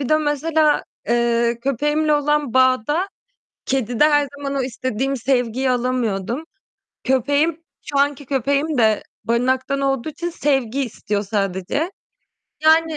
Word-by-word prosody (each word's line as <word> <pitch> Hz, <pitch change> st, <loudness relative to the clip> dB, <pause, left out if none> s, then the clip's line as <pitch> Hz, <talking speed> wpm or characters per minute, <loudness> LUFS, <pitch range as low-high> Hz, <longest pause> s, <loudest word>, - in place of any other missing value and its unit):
bir 270 Hz, -, -3 dB
de 310 Hz, -, +4 dB
mesela, 305 Hz, +1 st, +1 dB, 0.2 s
eee, 235 Hz, 0 st, +2 dB
köpeğimle 295 Hz, +4 st, +1 dB
olan 295 Hz, -3 st, 0 dB
bağda 260 Hz, -, +3 dB, 0.6 s
kedide 250 Hz, 0 st, +1 dB
her 290 Hz, -1 st, +3 dB
zaman 280 Hz, -1 st, -4 dB
o 275 Hz, -, 0 dB
istediğim 255 Hz, +1 st, -2 dB
sevgiyi 255 Hz, 0 st, 0 dB
alamıyordum. 245 Hz, 0 st, -1 dB, 0.6 s
Köpeğim, 285 Hz, +6 st, +1 dB, 0.2 s
şu 285 Hz, -, -2 dB
anki 285 Hz, 0 st, +1 dB
köpeğim 280 Hz, +3 st, 0 dB
de 220 Hz, -2 st, +3 dB, 0.2 s
barınaktan 255 Hz, +4 st, 0 dB
olduğu 270 Hz, 0 st, 0 dB
için 340 Hz, +3 st, -4 dB
sevgi 270 Hz, -5 st, 0 dB
istiyor 210 Hz, -3 st, -3 dB
sadece. 200 Hz, -, -2 dB, 0.7 s
Yani 320 Hz, 0 st, +4 dB
270 Hz, 120 wpm, -21 LUFS, 240-295 Hz, 0.7 s, de